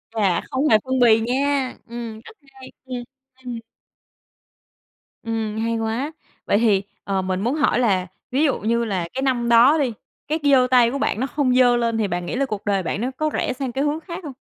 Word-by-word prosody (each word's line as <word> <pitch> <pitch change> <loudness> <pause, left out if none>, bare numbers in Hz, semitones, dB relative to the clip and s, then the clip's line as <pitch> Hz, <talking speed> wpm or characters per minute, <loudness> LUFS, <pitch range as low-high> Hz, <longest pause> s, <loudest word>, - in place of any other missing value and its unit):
Chà, 195 -5 +2
không 270 +3 +1
hề 215 - +6
phân 260 0 0
bì 225 -2 +6
nha! 265 +3 0
Ừm, 230 -2 -7
rất 335 - -14 0.2
hay, 260 -1 -13
ừm, 250 -2 -5 0.4
ừm. 240 -2 -5 1.6
Ừm, 225 -1 -3
hay 230 0 -1
quá, 225 +7 -2 0.3
vậy - - +2
thì, 205 -3 +3 0.2
ờ, 195 -1 -1
mình 185 0 -2
muốn 245 +7 0
hỏi 260 -4 +2
là 190 -6 +1 0.2
ví 275 +4 +2
dụ 280 - +1
như 235 +2 0
là 185 -6 -2
cái 265 - -3
năm 245 -3 0
đó 245 +7 +6
đi, 260 -6 0 0.3
cái 310 +2 -1
c - - -25
giơ 265 -3 +5
tay 240 -2 +5
của 275 - -2
bạn 245 - -1
nó 260 - 0
không 265 -4 0
giơ 245 -1 +5
lên 230 -1 0
thì 215 -2 +1
bạn 175 -1 -3
nghĩ - - -4
là 275 +2 +1
cuộc 210 -5 -5
đời 195 -2 +1
bạn 195 +5 -3
nó 255 +2 -1
có 310 0 0
rẽ - - -1
sang 255 -1 -4
cái 270 +3 -1
hướng 295 +2 0
khác 340 +2 -7
hông? 285 -3 -7
240 Hz, 225 wpm, -22 LUFS, 220-265 Hz, 1.6 s, hề